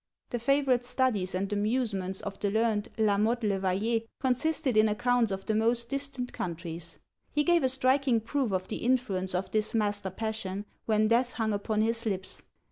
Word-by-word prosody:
The 240 - -1
favourite 265 0 +2
studies 245 -7 0
and 195 +2 -1
amusements 205 -3 -1
of 200 -1 -6
the 205 - 0
learned 220 0 +1
La 210 -2 +3
Mothe 230 +3 +1
le 200 -2 +1
Vayer 200 +5 0 0.2
consisted 265 +1 +1
in 215 0 +5
accounts 240 +1 +2
of 195 0 -4
the 220 - 0
most 235 +2 +2
distant 275 -3 -3
countries. 170 -1 -4 0.3
He 295 - +2
gave 345 0 +3
a 260 - +3
striking 260 -1 +3
proof 240 +1 -1
of 185 -1 -1
the - - -3
influence 215 -7 0
of 185 +1 -2
this 215 +1 0
master 205 -3 0
passion, 205 -1 -3 0.2
when 215 -1 +3
death 240 +2 +2
hung 220 -2 -1
upon 210 +1 0
his 230 +1 +1
lips. 190 -2 -2
220 Hz, 180 wpm, -29 LUFS, 200-245 Hz, 0.3 s, in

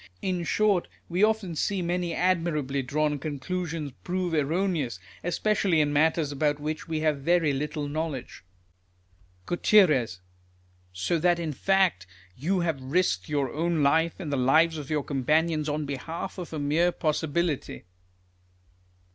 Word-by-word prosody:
In 180 -2 -1
short, 205 -1 +2 0.2
we 180 +4 +1
often 215 -6 +1
see 190 +3 -1
many 175 0 -1
admirably 165 -6 0
drawn 150 +2 0
conclusions 155 +1 -4
prove 180 -1 -2
erroneous, 155 - 0 0.2
especially 190 -1 +1
in 145 -1 +2
matters 155 0 +2
about 145 +1 0
which 155 +2 -4
we 160 -1 -2
have 155 -2 +1
very 165 -1 +2
little 150 +1 -3
knowledge. 150 - -4 1.0
Gut 175 - -4 1.3
So 95 - -1
that 175 +1 +3
in 165 -3 -3
fact 190 - +2 0.3
you 180 +7 0
have 165 -6 -1
risked 130 - 0
your 140 -3 -1
own 165 0 0
life, 160 +4 +3
and 155 -6 -4
the - - +1
lives 155 +5 +3
of 145 - -8
your 150 -2 0
companions, 155 +3 +1
on 150 0 -2
behalf 145 +7 -5
of 175 - -7
a 160 - -4
mere 155 +5 +2
possibility. 160 -1 -1
155 Hz, 140 wpm, -27 LUFS, 145-175 Hz, 1.3 s, that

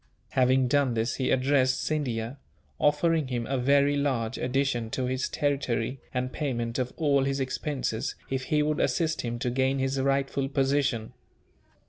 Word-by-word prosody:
Having 130 0 +3
done 135 -2 +2
this 115 +2 -1
he 130 - 0
addressed 130 0 +2
Scindia; 130 -4 -2 0.4
offering 150 0 +2
him 120 -2 -2
a 135 +1 -1
very 140 +2 +3
large 130 -5 -1
addition 125 -3 0
to 130 +3 -2
his 130 +1 -1
territory, 135 -3 -1
and 130 0 -2
payment 120 -5 -2
of 125 -1 -1
all 140 -4 +3
his 135 0 -1
expenses, 130 -3 -2
if 130 0 -2
he 150 +1 +2
would 150 +1 0
assist 165 -2 +1
him 120 -1 -3
to 125 0 -2
gain 130 +2 +1
his 135 0 0
rightful 135 0 0
position. 135 -4 0
135 Hz, 155 wpm, -27 LUFS, 125-140 Hz, 0.4 s, Having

